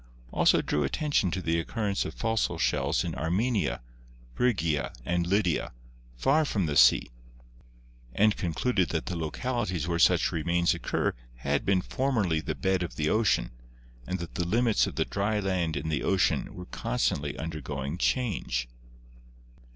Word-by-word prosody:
also - - +3
drew 75 - 0
attention 125 - +1
to 95 +2 -3
the 85 0 +1
occurrence 100 +3 -1
of - - -6
fossil 115 -6 0
shells 75 -1 +1
in 85 -2 -3
Armenia, 90 - 0 0.5
Phrygia 85 - 0
and 85 +3 0
Lydia, 90 - +1 0.4
far 150 - +3
from 105 - 0
the 75 -2 -2
sea, - - +5 1.0
and 105 0 +4
concluded 90 +2 0
that 80 - -2
the 90 - -3
localities 90 - -2
where 85 -1 -1
such - - +4
remains 85 +2 +1
occur - - -1 0.2
had 70 +7 -1
been 95 -2 +3
formerly 110 - 0
the 75 - -3
bed 95 -1 0
of 80 -9 -4
the 75 +3 0
ocean 110 -2 +2 0.6
and 95 - -2
that 85 -2 -7
the 90 - -1
limits 115 +3 +2
of - - -6
the - - +1
dry 105 +1 -1
land 90 -6 -1
and 80 +3 -3
the 75 - 0
ocean 95 -2 +1
were 90 - -8
constantly 70 +2 -1
undergoing 75 -1 -4
change. 90 - 0
85 Hz, 150 wpm, -28 LUFS, 80-105 Hz, 1.0 s, sea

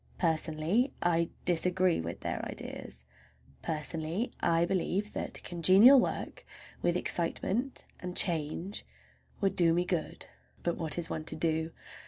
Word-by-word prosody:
Personally, 165 - +1
I 170 -1 +2 0.2
disagree 180 +1 +2
with 85 +1 -6
their - - -3
ideas. 65 0 -5 0.6
Personally, 160 - -2
I 170 0 +2
believe 195 +3 -1
that - - -3
congenial 190 +10 +6
work, - - -3 0.4
with 175 0 +1
excitement 195 +11 -1
and 180 0 -6
change, 170 +3 +1 0.6
would 195 -1 +1
do 170 -2 +4
me 175 +1 +1
good. 175 -3 -3 0.4
But 170 - 0
what 160 -1 -1
is 170 -1 -2
one 155 -1 -4
to 160 - -1
do? 160 0 0
170 Hz, 130 wpm, -31 LUFS, 160-185 Hz, 0.6 s, congenial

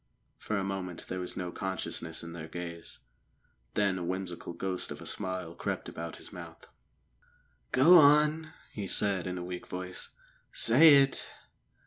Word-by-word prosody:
For 110 - -2
a 100 - -1
moment 95 -3 -4
there 95 - -3
was 90 - -4
no 90 -1 -3
consciousness 85 -4 -3
in 85 - -7
their 80 -2 -7
gaze; 85 -1 -8 0.8
then 100 -3 +1
a - - -4
whimsical 90 -1 -4
ghost 90 +1 -2
of - - -7
a - - -10
smile 95 -3 -3
crept 85 - -4
about 85 0 -6
his - - -10
mouth. - - -10 1.1
"Go 170 +7 +8
on," 150 +2 +4 0.2
he 100 -3 -4
said 95 -2 +1
in 90 0 -3
a 90 - -4
weak 90 0 -6
voice. 90 0 -7 0.4
"Say 165 - +7
it!" 135 - -3
95 Hz, 155 wpm, -30 LUFS, 90-105 Hz, 1.1 s, Go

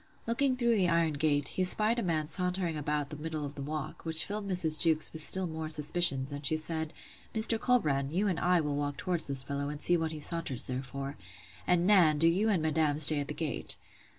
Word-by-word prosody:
Looking 255 +3 0
through 235 -2 +1
the 185 -3 +1
iron 165 -2 +1
gate, 145 -1 -1
he 185 - -2
spied 215 +5 +2
a - - -1
man 160 -5 -2
sauntering 180 -1 -3
about 150 -1 -3
the 150 - -5
middle 155 -1 -5
of 140 - -8
the 145 - -9
walk; 150 +1 -6
which 160 0 +3
filled 205 0 -6
Mrs. 170 -5 +2
Jewkes 160 -2 +3
with 160 - -3
still 190 +4 +2
more 160 -2 -6
suspicions; 150 -3 +2
and 145 +1 -7
she 155 +3 +1
said, 160 0 -5 0.4
Mr. 220 +1 +2
Colbrand, 145 - 0
you 195 +6 -1
and 180 -4 -2
I 180 -1 +2
will 145 -2 -3
walk 145 -1 -4
towards 175 -2 +1
this 135 -2 +2
fellow, 140 +1 -4
and 150 0 -7
see 175 +3 +5
what 160 -1 -3
he 155 - -7
saunters 155 -5 0
there 130 0 -4
for: 135 +1 -8 0.5
And, 175 -1 +1
Nan, 180 -7 +4
do 165 +2 +3
you 195 +7 +1
and 185 -7 0
madam 155 -2 0
stay 155 0 +7
at 140 - -4
the - - -6
gate. - - -1
160 Hz, 230 wpm, -29 LUFS, 145-180 Hz, 0.5 s, stay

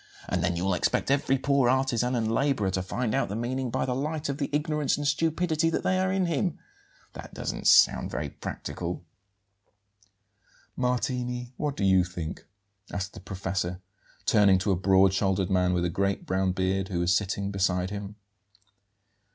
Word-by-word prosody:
And 90 -1 -1
then 90 -1 +1
you'll 95 +3 0
expect 90 - 0
every 135 -1 +2
poor 140 -2 +2
artisan 125 -1 +1
and 110 -2 0
labourer 130 -7 +1
to 95 - -1
find 110 +4 -2
out - - 0
the 100 - -3
meaning 125 +3 -2
by 130 +3 -1
the 125 - -1
light 150 +3 -2
of 140 +1 -3
the 140 - -1
ignorance 150 -1 0
and 145 0 -2
stupidity 160 +2 +1
that 165 - -2
are 185 0 +2
in 190 -1 +1
him! 170 0 -1 0.6
That - - -10
doesn't - - -3
sound - - +5
very 75 +2 -3
practicable." 90 0 -5 1.7
"Martini, 125 0 -2
what 145 0 -3
do - - -1
you 95 -1 +5
think?" 90 -3 -6 0.4
asked 95 0 -4
the 110 - -9
professor, 95 -2 -3 0.5
turning 105 -6 +5
to 95 +2 0
a - - +3
broad 95 +1 +4
shouldered 95 -1 0
man 90 -1 +3
with 90 -1 +1
a - - 0
great 100 +2 -1
brown 95 0 +1
beard, 95 +1 0
who 90 -3 -2
was 90 +1 +3
sitting 100 0 -1
beside 95 -1 0
him. 100 0 -6
105 Hz, 170 wpm, -27 LUFS, 95-135 Hz, 1.7 s, sound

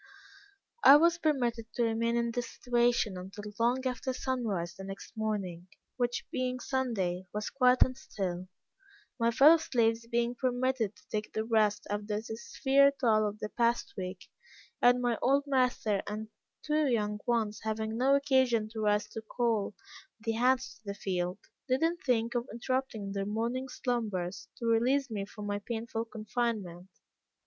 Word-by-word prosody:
"I 275 - +10
was 335 +3 +4
permitted 240 -8 0
to 240 - +1
remain 230 +1 +1
in 235 0 0
this 240 0 -3
situation 240 -5 +1
until 205 +3 -8
long 245 +3 +2
after 255 +1 -2
sunrise 220 -10 -2
the 195 - -10
next 195 +3 -9
morning, 195 -5 -3 0.3
which 245 -1 -1
being 255 0 -1
Sunday, 200 -10 -1
was 210 0 -3
quiet 255 -1 +5
and 255 - -4
still; 185 -7 -4 0.7
my 230 0 +3
fellow 285 +8 +7
slaves 230 -6 +1
being 235 0 0
permitted 245 -3 0
to - - -23
take 215 0 -3
their 220 - -1
rest 215 -2 +2
after 205 0 -2
the 215 - -3
severe 275 +4 +3
toil 215 -4 +3
of 205 0 -5
the 210 0 -5
past 235 +1 0
week, 185 -1 -6 0.5
and 245 0 +5
my 240 -2 +1
old 275 +2 +3
master 250 -7 +1
and 215 +1 -5 0.4
two 305 -1 +2
young 210 -4 0
ones 225 -3 0
having 220 0 -2
no 265 +4 +4
occasion 260 -6 +2
to 220 0 -7
rise 210 0 +2
to 225 - -6
call 220 -2 -1 0.4
the 225 +1 -2
hands 255 +3 +1
to 225 - -36
the 200 0 -4
field, 180 -2 -2 0.3
did 260 +1 +1
not 335 +1 +1
think 235 -2 +1
of 240 0 -1
interrupting 235 -3 -2
their 195 0 -2
morning 235 +5 -2
slumbers, 210 -9 -3
to 235 - -5
release 245 +4 +2
me 200 -2 -3
from 210 0 -8
my 205 0 -2
painful 225 +1 -4
confinement. 215 -5 -3
230 Hz, 160 wpm, -31 LUFS, 210-250 Hz, 0.7 s, I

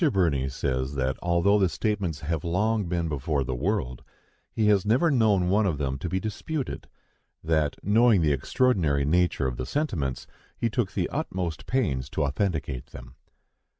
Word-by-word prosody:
Birney 75 - +1
says 65 +1 -2
that, 65 0 0
although 85 +4 +3
the 95 -2 +3
statements 95 -5 -2
have 80 0 -2
long 105 +5 +1
been 85 -1 -1
before 75 -1 -1
the 65 - -3
world, 65 - -2 0.5
he 110 - 0
has 105 -3 +4
never 130 +10 +3
known 105 -8 +3
one 100 +3 +3
of 80 -6 -1
them 65 -2 -2
to 85 - -4
be 95 - 0
disputed; 130 +8 -4 0.6
that, 80 -2 +1
knowing 110 -1 +4
the 75 -2 +3
extraordinary 75 - +1
nature 85 -2 +2
of 65 -2 -2
the 65 - -3
sentiments, 85 - -2 0.3
he 115 - -1
took 105 -4 -1
the - - 0
utmost 90 -4 -3
pains 70 - 0
to 75 - -1
authenticate 70 - -2
them. 60 -2 -12
85 Hz, 165 wpm, -26 LUFS, 70-105 Hz, 0.6 s, has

